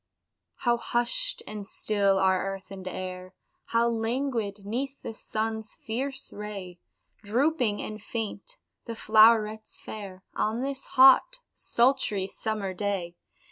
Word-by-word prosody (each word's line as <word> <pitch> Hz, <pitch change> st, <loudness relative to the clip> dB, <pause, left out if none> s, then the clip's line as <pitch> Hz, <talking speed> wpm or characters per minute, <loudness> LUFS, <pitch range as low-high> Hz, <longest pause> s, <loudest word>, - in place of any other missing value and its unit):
How 240 Hz, -1 st, +1 dB
hushed 240 Hz, -, 0 dB
and 210 Hz, -2 st, -7 dB
still 200 Hz, -2 st, +2 dB
are 190 Hz, -1 st, +3 dB
earth 195 Hz, 0 st, -14 dB
and 190 Hz, -1 st, -8 dB
air, 185 Hz, 0 st, -6 dB, 0.3 s
How 230 Hz, 0 st, +2 dB
languid 225 Hz, -3 st, -1 dB
'neath 265 Hz, +6 st, -3 dB
the -, -, -5 dB
sun's 220 Hz, 0 st, -3 dB
fierce 265 Hz, +5 st, -3 dB
ray 195 Hz, -4 st, -7 dB, 0.4 s
Drooping 240 Hz, 0 st, +1 dB
and 215 Hz, 0 st, -6 dB
faint 230 Hz, -, -5 dB, 0.3 s
the 230 Hz, -, -5 dB
flowrets 220 Hz, 0 st, +4 dB
fair, 195 Hz, -3 st, -8 dB
On 225 Hz, +4 st, -1 dB
this 275 Hz, 0 st, -4 dB
hot, 270 Hz, -, +7 dB
sultry, 235 Hz, -6 st, +1 dB
summer 200 Hz, -1 st, -3 dB
day! 185 Hz, -3 st, -2 dB
220 Hz, 120 wpm, -28 LUFS, 200-240 Hz, 0.4 s, hot